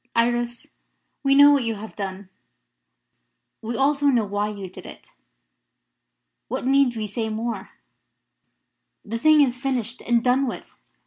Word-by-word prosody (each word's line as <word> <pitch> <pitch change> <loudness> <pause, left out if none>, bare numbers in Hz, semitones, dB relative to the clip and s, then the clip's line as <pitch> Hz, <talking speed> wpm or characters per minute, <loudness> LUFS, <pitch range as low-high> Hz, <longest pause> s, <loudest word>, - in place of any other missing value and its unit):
"Iris, 240 0 0 0.5
we 275 0 +3
know 285 +1 +8
what 280 -3 +3
you 225 -1 -2
have 215 +2 -10
done. 195 -1 -6 1.3
We 230 +1 -4
also 285 +1 +2
know 240 -6 +3
why 205 +1 -2
you 200 -2 -7
did 180 - -12
it. - - -13 1.4
What - - -4
need 270 -2 +3
we 215 - -2
say 220 +2 -3
more? 220 -2 -4 1.4
The 230 +2 -4
thing 310 +2 +5
is 250 -3 +2
finished 250 -3 -3
and 235 -1 +1
done 260 +2 +2
with. - - -5
235 Hz, 140 wpm, -23 LUFS, 215-270 Hz, 1.4 s, know